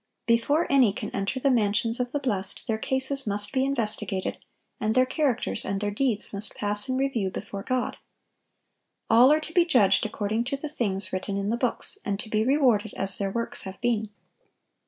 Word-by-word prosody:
Before 240 Hz, +8 st, +2 dB
any 260 Hz, -7 st, +4 dB
can 210 Hz, 0 st, -6 dB
enter 195 Hz, +7 st, -2 dB
the 275 Hz, +1 st, +2 dB
mansions 225 Hz, 0 st, +1 dB
of 245 Hz, 0 st, -2 dB
the 290 Hz, -, -1 dB
blest, 205 Hz, -9 st, -3 dB
their 220 Hz, -1 st, -2 dB
cases 265 Hz, +1 st, +1 dB
must 205 Hz, 0 st, +2 dB
be 260 Hz, -1 st, +1 dB
investigated, 210 Hz, -7 st, -2 dB, 0.4 s
and 215 Hz, +1 st, -1 dB
their 255 Hz, 0 st, +4 dB
characters 255 Hz, -5 st, -1 dB
and 195 Hz, 0 st, -2 dB
their 205 Hz, 0 st, -2 dB
deeds 215 Hz, -2 st, -2 dB
must 200 Hz, +1 st, -2 dB
pass 205 Hz, +4 st, -1 dB
in 255 Hz, -, 0 dB
review 260 Hz, -8 st, -1 dB
before 195 Hz, +1 st, -7 dB
God. 255 Hz, +3 st, -2 dB, 1.1 s
All 240 Hz, +5 st, +7 dB
are 305 Hz, -, +4 dB
to 310 Hz, +1 st, -7 dB
be 350 Hz, -, +5 dB
judged 250 Hz, -, +3 dB
according 215 Hz, +2 st, -2 dB
to 275 Hz, +2 st, -2 dB
the 300 Hz, +2 st, -6 dB
things 195 Hz, -10 st, -3 dB
written 195 Hz, +1 st, -3 dB
in 200 Hz, +1 st, -2 dB
the -, -, +1 dB
books, 245 Hz, 0 st, -1 dB
and 200 Hz, -2 st, -3 dB
to 215 Hz, -, -7 dB
be 215 Hz, 0 st, +1 dB
rewarded 245 Hz, -6 st, +2 dB
as 195 Hz, -1 st, +6 dB
their 200 Hz, -1 st, -1 dB
works 230 Hz, +4 st, -2 dB
have 190 Hz, 0 st, -8 dB
been. 220 Hz, -3 st, -1 dB
225 Hz, 195 wpm, -26 LUFS, 205-260 Hz, 1.1 s, All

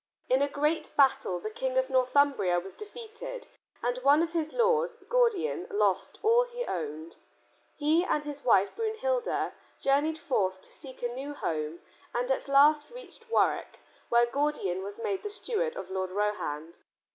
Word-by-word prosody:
In 260 Hz, +2 st, +4 dB
a 285 Hz, -, +3 dB
great 300 Hz, +3 st, 0 dB
battle 260 Hz, -10 st, +3 dB
the 215 Hz, +5 st, -5 dB
King 260 Hz, +3 st, -2 dB
of 260 Hz, +1 st, +1 dB
Northumbria 255 Hz, -8 st, +3 dB
was 190 Hz, +2 st, -9 dB
defeated 470 Hz, +3 st, -8 dB, 0.4 s
and 245 Hz, +1 st, 0 dB
one 285 Hz, +5 st, +5 dB
of 335 Hz, -, -2 dB
his 315 Hz, -2 st, -1 dB
lords, 480 Hz, 0 st, +2 dB
Gordian, 475 Hz, -3 st, +1 dB
lost 410 Hz, -, +1 dB
all 465 Hz, +3 st, +5 dB
he -, -, -5 dB
owned. 160 Hz, -1 st, -5 dB, 0.6 s
He 310 Hz, +3 st, +2 dB
and 300 Hz, -5 st, 0 dB
his 290 Hz, -1 st, -7 dB
wife 200 Hz, -5 st, +3 dB
Brunhilda 460 Hz, +2 st, -1 dB, 0.3 s
journeyed 290 Hz, +3 st, +2 dB
forth 190 Hz, -, 0 dB
to -, -, -10 dB
seek 260 Hz, -3 st, -10 dB
a -, -, +2 dB
new 280 Hz, +3 st, -6 dB
home 155 Hz, -, -3 dB, 0.3 s
and 245 Hz, +2 st, 0 dB
at 265 Hz, -, -1 dB
last 295 Hz, +2 st, +5 dB
reached 480 Hz, -1 st, -13 dB
Warwick, -, -, +1 dB, 0.3 s
where 235 Hz, 0 st, +5 dB
Gordian 240 Hz, -8 st, -1 dB
was 200 Hz, +1 st, -6 dB
made 380 Hz, +11 st, -2 dB
the 415 Hz, -, -4 dB
steward 470 Hz, +3 st, -2 dB
of -, -, -7 dB
Lord 190 Hz, -1 st, -2 dB
Rohand. 180 Hz, -6 st, -2 dB
285 Hz, 160 wpm, -29 LUFS, -, 0.6 s, one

